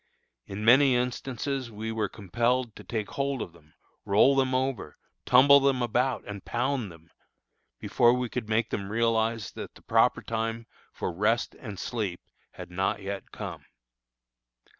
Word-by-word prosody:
In 105 +2 -5
many 130 +2 +6
instances 125 +1 -2
we 110 +1 -5
were 110 -3 -1
compelled 120 +4 -1
to - - -11
take 110 -3 -4
hold 140 -1 -1
of 85 - -6
them, 75 -3 -22 0.3
roll 110 +8 +4
them 130 -1 +2
over, 130 -3 -2 0.3
tumble 140 +3 +7
them 135 -2 +2
about, 125 +2 0
and 100 -1 -7
pound 125 -4 -1
them, 80 0 -17 0.7
before 120 -1 +3
we 125 0 0
could 115 -2 -5
make 110 +1 +1
them 100 -1 -3
realize 115 -2 0
that - - -8
the - - -17
proper - - +2
time 115 0 -3 0.3
for 90 - -4
rest 105 +6 +1
and 105 -6 -9
sleep 100 -5 -3 0.3
had 90 -1 -10
not 95 +2 -1
yet 100 0 -5
come. - - -7
115 Hz, 155 wpm, -27 LUFS, 105-125 Hz, 0.7 s, tumble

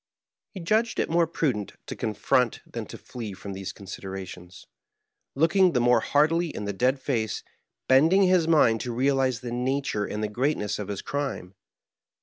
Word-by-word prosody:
He - - -5
judged 220 +6 +1
it - - 0
more 170 0 +3
prudent 130 - -1
to - - -6
confront 115 +2 0
than - - -6
to - - -9
flee 115 -5 -7
from 100 +1 -8
these 95 0 -5
considerations; 95 -2 -9 0.7
looking 175 +5 +4
the 125 - +2
more 120 0 +4
hardily 160 +7 +2
in 105 - -5
the 100 - -2
dead 130 +7 +1
face, 110 -6 -2 0.4
bending 160 +9 +5
his 180 -3 +3
mind 125 -9 +4
to 120 -2 -4
realize 130 -1 +1
the 120 -2 -5
nature 125 -3 -1
and 105 0 -4
greatness 125 -5 -1
of 105 - -4
his 100 -2 -5
crime. 140 -10 -4
125 Hz, 160 wpm, -26 LUFS, 105-155 Hz, 0.7 s, bending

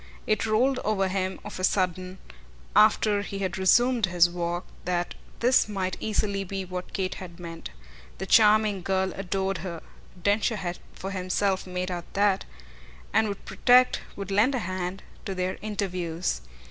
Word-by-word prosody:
It 215 +1 +1
rolled 250 +5 +2
over 195 -3 +1
him 185 0 -2
of 210 - -7
a - - -4
sudden, 185 0 0 0.6
after 210 0 +5
he 200 -1 -5
had 190 -1 -2
resumed 240 +3 +4
his 175 0 +4
walk, 175 0 -2 0.2
that 175 0 -1 0.3
this 245 -2 +4
might 185 -3 -2
easily 200 -2 -1
be 195 0 -4
what 180 0 -6
Kate 190 -2 -2
had 180 -2 -9
meant. 165 - -7 0.5
The 190 - -4
charming 210 -1 +5
girl 190 +1 0
adored 195 0 -2
her 170 -3 -5 0.4
Densher 205 +5 +2
had 180 -3 -4
for 195 - -6
himself 190 0 0
made 180 0 -3
out 175 -1 -6
that 200 -1 +2 0.7
and 220 - +4
would 200 -1 -6
protect, 250 0 +4
would 200 -1 -6
lend 220 +8 +3
a 230 -7 -2
hand, 185 +1 -4 0.2
to 195 - -3
their 185 0 -2
interviews. 180 - -2
190 Hz, 160 wpm, -27 LUFS, 180-210 Hz, 0.7 s, after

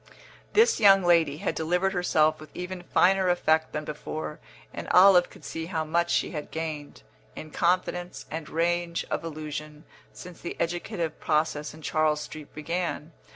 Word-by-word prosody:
This 450 +3 +4
young 195 -3 +7
lady 165 -4 +3
had - - -2
delivered 180 +4 0
herself 155 -4 +2
with 155 - -12
even 180 0 -5
finer 185 +1 +3
effect 160 -3 +2
than 150 0 -4
before, 150 0 -6 0.3
and - - -6
Olive 180 -1 +7
could - - -15
see 165 0 -5
how 160 -3 -2
much 170 +2 +1
she - - +1
had 150 -3 -6
gained, 155 -3 -6 0.3
in 155 - -9
confidence 175 +1 -1
and 160 -1 -5
range 170 +1 0
of - - -1
allusion, 150 -1 -6 0.3
since 180 -1 -11
the 170 - -6
educative 170 0 -3
process 150 -1 -1
in 155 - -14
Charles 155 -1 +1
Street 150 -1 -9
began. 165 0 -3
165 Hz, 155 wpm, -27 LUFS, 155-180 Hz, 0.3 s, young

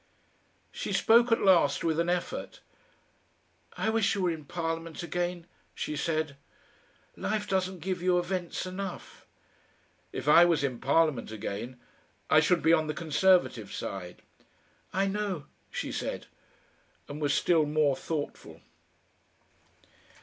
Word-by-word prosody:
She - - -4
spoke 235 +2 +5
at 230 - +3
last 170 -7 +4
with 160 -1 +1
an 170 +1 +1
effort. 180 0 -3 1.2
"I 220 - 0
wish 220 -3 +2
you 195 - -1
were 180 - +2
in 155 -3 -6
Parliament 165 +1 -4
again," 175 0 -3 0.3
she 150 - -3
said. 155 -1 -1 0.8
"Life 210 -1 -2
doesn't 185 -2 -1
give 185 +1 -3
you 180 0 +3
events 180 0 -2
enough." 185 0 -7 0.8
"If - - -6
I 165 +3 +8
was 170 -5 +3
in 130 -4 -2
Parliament 150 -3 +2
again, 110 +3 -5 0.5
I - - +7
should 180 -3 +2
be 165 - +5
on 155 -2 +3
the 150 - -3
Conservative 165 - +2
side." 90 -3 -6 0.7
"I 195 +1 +1
know," 195 -5 -2 0.2
she - - -4
said, - - -4 0.8
and 145 +2 -7
was 145 -2 +2
still 160 -4 +3
more 150 -2 +2
thoughtful. 150 0 -5
165 Hz, 130 wpm, -29 LUFS, 150-185 Hz, 1.2 s, I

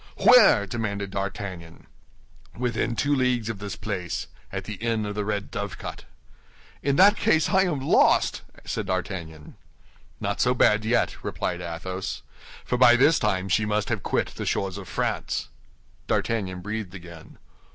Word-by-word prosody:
"Where?" 245 - +7
demanded 100 -2 -3
D'Artagnan. 95 -4 -5 0.7
"Within 120 -1 -1
two 145 +4 +1
leagues 125 -4 +1
of 110 -4 -4
this 100 -2 -5
place, 95 -4 -4 0.3
at - - -4
the - - -6
inn 115 -2 -1
of 105 - -4
the 105 0 -2
Red 105 -1 -3
Dovecot." - - -6 0.8
"In 140 -1 +1
that 200 +6 +7
case 160 -9 +2
I 190 0 +4
am 160 -6 -1
lost," 135 - +3 0.2
said - - -3
D'Artagnan. 85 -5 -5 0.6
"Not - - -2
so 125 +1 +3
bad 110 -2 +3
yet," 120 +1 0
replied 90 -1 -3
Athos; 90 +2 -5 0.4
"for 125 - -1
by 120 -1 +8
this 145 +6 +4
time 95 -3 0
she 100 +3 +2
must 105 0 -1
have 110 -4 -1
quit - - -1
the - - -6
shores 95 0 -1
of 95 - -10
France." - - -2 0.6
D'Artagnan 95 -5 -1
breathed 105 -1 -5
again. 85 -3 -12
105 Hz, 150 wpm, -25 LUFS, 95-120 Hz, 0.8 s, by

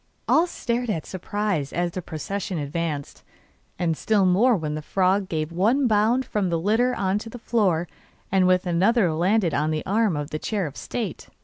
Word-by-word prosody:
All 335 +3 +4
stared 245 -6 -2
in 165 -7 -1
surprise 190 -5 -2
as 175 0 -1
the 185 - -4
procession 185 +4 -4
advanced, 150 -1 -4 0.5
and 165 -2 0
still 205 +3 +2
more 215 +7 +4
when 155 -3 -3
the 155 - -4
frog 190 +4 +1
gave 155 -1 -2
one 225 +11 +2
bound 225 +3 +2
from 205 -6 -1
the 170 - +1
litter 225 +8 +2
on 195 +1 0
to 225 - -8
the 245 - -8
floor, 195 -8 +1 0.4
and 190 -1 +4
with 185 +1 +3
another 180 +1 +2
landed 180 +1 +2
on 150 +2 +1
the 155 -1 -2
arm 205 -4 +1
of 145 0 -4
the 155 - -3
chair 205 0 -2
of 145 -2 -7
state. 235 -4 -5
185 Hz, 190 wpm, -24 LUFS, 165-215 Hz, 0.5 s, All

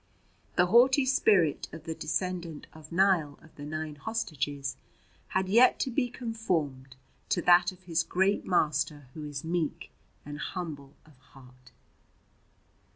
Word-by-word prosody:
The 180 - +4
haughty 260 +7 +5
spirit 205 - +3
of 160 0 -9
the 165 -1 -4
descendant 175 -1 -3
of 155 0 -14
Niall 170 -5 +2
of 160 - -18
the 145 - -10
Nine 155 0 -4
Hostages 145 -10 -3 0.5
had 190 0 -1
yet 235 +6 +5
to 260 - -1
be 245 0 0
conformed 165 - -3 0.3
to - - +1
that 175 0 +5
of 185 0 -18
his 170 -2 +1
great 190 +4 +1
Master 150 -5 0
Who 155 - -8
is 145 -2 -6
meek 165 -2 -3 0.3
and 145 0 -7
humble 150 -7 -6
of 150 -5 -21
heart. 130 -1 -18
165 Hz, 140 wpm, -29 LUFS, 145-190 Hz, 0.5 s, haughty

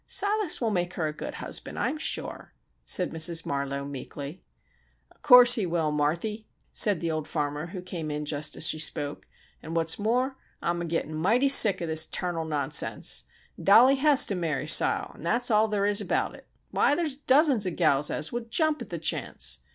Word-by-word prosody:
"Silas 410 -3 +1
will 230 -3 -2
make 175 -2 -3
her 160 - -3
a 155 - -4
good - - -8
husband, - - -6
I'm 310 - -3
sure," - - -4 0.3
said 180 - +1
Mrs. 165 0 +1
Marlowe, 140 0 -4
meekly. 140 +3 -9 0.7
"O' - - -33
course 250 -3 +8
he 205 -6 -1
will, 165 -3 -2
Marthy," 170 +9 -3 0.3
said 205 -6 +4
the 165 -1 -2
old 155 -1 -5
farmer, 150 0 -4
who 180 0 -9
came 170 -4 -7
in 150 0 -5
just 150 0 -3
as 155 - +3
she 155 - +2
spoke. 145 -1 -1 0.3
"An' 160 +2 -8
what's 165 +2 +1
more, 250 +5 -1 0.2
I'm 170 0 -3
a - - -4
gittin' 165 -2 -4
mighty 225 - +1
sick 210 -9 +6
of 170 - -4
this 160 0 +3
tarnal 175 -3 -4
nonsense! 150 -3 -1 0.4
Dollie 245 +7 +5
hez 290 0 +4
got - - -4
tew 200 - -2
marry 155 -5 -3
Sile, 155 - +5
an' - - -16
thet's 245 0 -1
all 215 +1 +2
ther' 205 -1 -1
is 205 0 +2
abaout - - -2
it! - - -16 0.2
Why, 290 - +1
there's 315 -5 -3
dozens 275 - +2
of 180 - -5
gals 150 -4 +1
as 155 - -2
would 235 -1 -6
jump 310 +4 -1
at - - -9
ther' - - -5
chance! - - -2
175 Hz, 200 wpm, -25 LUFS, 155-235 Hz, 0.7 s, course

